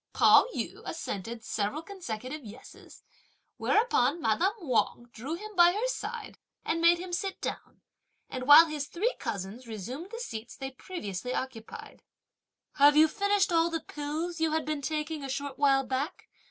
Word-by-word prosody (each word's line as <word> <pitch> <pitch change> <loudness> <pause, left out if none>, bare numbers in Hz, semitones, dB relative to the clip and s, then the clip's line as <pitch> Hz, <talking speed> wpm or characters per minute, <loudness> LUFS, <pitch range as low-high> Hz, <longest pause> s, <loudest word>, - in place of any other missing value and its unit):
Pao - - +6
yü - - -4
assented 230 - -5
several 220 +9 -2
consecutive 300 - -6
yes's; 225 +3 -13 0.5
whereupon 345 - +2
madame 335 - +1
Wang 240 -4 0
drew 270 +9 -4
him 425 +3 -9
by 350 0 +6
her 440 +5 -1
side - - -5 0.3
and 330 +1 0
made 340 +1 +6
him 355 0 -7
sit 385 +2 -2
down, - - -6 0.5
and 255 -1 -6
while 295 +3 +10
his 300 -3 -4
three 435 +8 -1
cousins 225 +1 -5
resumed 240 - -6
the 460 - -7
seats 235 - -6
they 270 -1 -6
previously 250 - -5
occupied: 240 -4 -7 0.8
"Have 290 +1 +6
you 315 +1 +8
finished 405 +3 +1
all 330 0 +3
the 330 -1 -2
pills 310 +4 -4
you 320 -1 +1
had 315 - 0
been 305 -2 -2
taking 305 0 -3
a 270 - -5
short 275 0 -4
while 275 -2 +4
back?" 265 +6 -3
295 Hz, 160 wpm, -29 LUFS, 250-340 Hz, 0.8 s, while